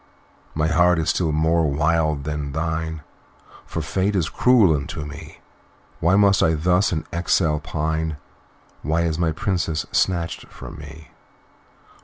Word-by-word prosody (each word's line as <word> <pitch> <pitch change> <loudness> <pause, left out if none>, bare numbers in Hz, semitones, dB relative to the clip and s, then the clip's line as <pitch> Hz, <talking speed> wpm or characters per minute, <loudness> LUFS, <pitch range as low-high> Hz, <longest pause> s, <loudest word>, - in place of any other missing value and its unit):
"My 75 0 +1
heart 90 +2 +3
is 80 +2 +1
still 85 -4 0
more 80 +1 +2
wild 75 0 +1
than 75 -1 -4
thine, 80 0 -3 0.6
For 80 - -4
Fate 95 +5 -1
is 85 -5 0
cruel 115 -10 +4
unto 75 +1 -5
me. 75 +2 -10 0.6
Why 85 +3 +3
must 100 -1 +4
I 80 0 +3
thus 90 +5 +2
in 80 -3 -2
exile 85 -2 +1
pine? 80 0 -2 0.6
Why 80 +2 0
is 80 -1 -1
my 85 -2 +1
Princess 80 -2 -1
snatched 85 -3 0
from - - -10
me? 80 0 -12
80 Hz, 140 wpm, -22 LUFS, 75-85 Hz, 0.6 s, cruel